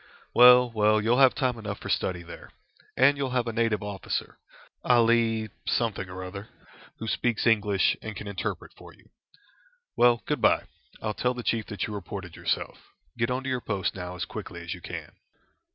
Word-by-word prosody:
"Well, 125 0 +8
well, 110 -1 +3
you'll 115 +4 +2
have 135 -2 +6
time 125 -4 0
enough 100 -2 -5
for - - -8
study 90 -2 -1
there. 85 - -11 0.5
And 140 +2 +5
you'll 140 -2 -1
have 120 - +1
a 115 - -3
native 110 -2 0
officer, 100 -2 -4 0.4
Ali 115 -2 +3 0.2
something 110 -5 -1
or 95 0 -7
other, 100 +3 -8 0.5
who 115 - -6
speaks 120 0 0
English, 105 -4 +3
and 110 -1 -6
can 105 - -7
interpret 100 -2 -4
for - - -14
you. - - -25 0.8
Well, 120 -2 +4
good - - -2
bye - - +4 0.4
I'll 110 -1 -1
tell 125 +3 -1
the 125 - -6
chief 115 -2 -1
that 100 -3 -3
you 105 - -6
reported 100 -4 -7
yourself. - - -2 0.4
Get 115 +1 0
on 125 +1 -2
to 135 - -3
your 130 -1 -1
post 100 -4 -2
now 90 -1 -6
as 90 - -3
quickly - - -8
as - - -5
you - - -10
can." - - -7
110 Hz, 185 wpm, -27 LUFS, 100-120 Hz, 0.8 s, Well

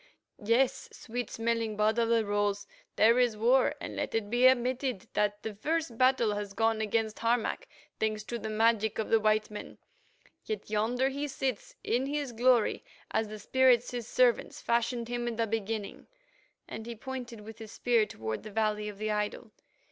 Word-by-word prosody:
"Yes, 235 +5 +2
sweet 245 -1 -5
smelling 225 -2 -1
Bud 215 +2 +2
of 230 -1 +2
the 230 -1 +3
Rose, 205 0 0 0.3
there 230 +3 +5
is 240 -4 +2
war, 250 +4 +3
and - - -6
let - - -3
it 215 -2 -1
be 245 +2 +6
admitted 255 -3 +1
that 205 0 0
the 220 - -4
first 305 +4 -2
battle 255 -3 +3
has 205 -1 -4
gone 225 +1 +1
against 220 0 -1
Harmac, 230 0 0 0.3
thanks 215 -1 -1
to 235 +2 -5
the 220 - -5
magic 220 0 +2
of 220 - -2
the 225 - +6
white 215 0 +1
men. 210 - -8 0.7
Yet 210 -1 -5
yonder 240 +5 +1
he 285 +2 -3
sits 265 -4 -3
in 250 +3 0
his 285 -2 -2
glory 240 -1 +2 0.3
as 220 - 0
the 215 +1 -7
spirits, 250 +1 +3
his 240 -2 -5
servants, 245 -1 +2
fashioned 235 0 0
him 240 0 -3
in 235 - -2
the 230 0 +1
beginning," 220 -1 -4 0.6
and 220 - -7
he 235 - -5
pointed 245 -2 -7
with 220 +2 -11
his 220 -1 -9
spear 235 -3 +2
toward 110 0 -5
the 215 - -9
valley 210 0 0
of 205 - -9
the 215 +1 -2
idol. 210 +2 -3
225 Hz, 180 wpm, -30 LUFS, 215-245 Hz, 0.7 s, be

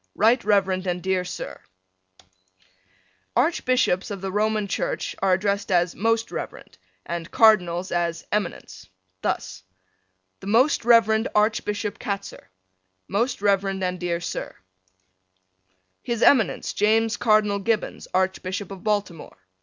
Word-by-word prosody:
Rt. 230 +4 +3
Rev. 190 -2 +1
and 180 0 -2
dear 190 -1 0
Sir: 180 - -7 1.7
Archbishops 255 - +1
of 200 -2 -5
the 190 0 -4
Roman 215 +1 0
Church - - -3
are 190 -1 +3
addressed 200 +1 -1
as 175 -1 +2
Most 225 +2 0
Reverend - - -7 0.3
and 170 -1 -5
Cardinals 185 -5 +3
as 170 -1 -1
Eminence. 175 - -4 0.3
Thus: 95 - -3 0.8
The - - -10
Most 235 +4 +3
Rev. 225 -2 +4
Archbishop 210 -1 0
Katzer. 200 - -5 0.6
Most 215 +2 -1
Rev. 200 -1 +3
and 190 -2 -2
dear 175 -1 -2
Sir: 170 - -5 1.5
His 235 -2 -2
Eminence, 255 -7 +3
James 220 +2 +2
Cardinal 215 -3 +2
Gibbons, 220 +1 -2
Archbishop 190 +1 -2
of 195 -2 -9
Baltimore. 205 -6 -2
200 Hz, 115 wpm, -24 LUFS, 185-220 Hz, 1.7 s, Rev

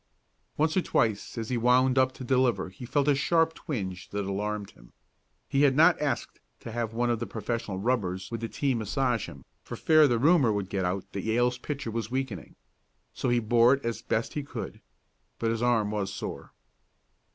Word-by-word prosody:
Once 155 +1 +1
or 185 - +3
twice 110 - 0
as 115 -1 -4
he 125 - 0
wound 125 +2 +4
up 130 -1 +3
to 130 - -10
deliver 125 -5 +1
he 105 +7 -10
felt 145 +2 +1
a 145 - +5
sharp 165 +3 +2
twinge 95 - -5
that 100 -1 -3
alarmed 105 +1 -3
him. - - -20 0.5
He 140 - +1
had 140 -2 +4
not 165 +3 +5
asked 150 -2 -2 0.2
to 115 - -7
have 115 -1 -3
one 120 +1 +1
of 115 - -1
the 120 - -4
professional 110 -1 -3
rubbers 95 -4 -1
with 115 -1 -4
the 115 - -2
team 135 -5 0
massage 120 +1 0
him, 70 - -13 0.2
for - - -7
fear 155 -1 +5
the 120 -3 +2
rumor 145 -2 +4
would 100 -2 -2
get 95 -1 -1
out 90 +1 -3
that 100 - -3
Yale's 120 +3 +1
pitcher 140 -3 -4
was 110 -1 -3
weakening. 125 - -4 0.6
So 130 - -2
he 120 - +3
bore 120 +3 +4
it 135 - -10
as 115 -1 -2
best 115 - -1
he 150 - -2
could. 140 - -7 0.6
But 115 -1 0
his 115 0 -2
arm 115 -4 +2
was 100 -2 -2
sore. 95 - -6
120 Hz, 200 wpm, -28 LUFS, 105-130 Hz, 0.6 s, a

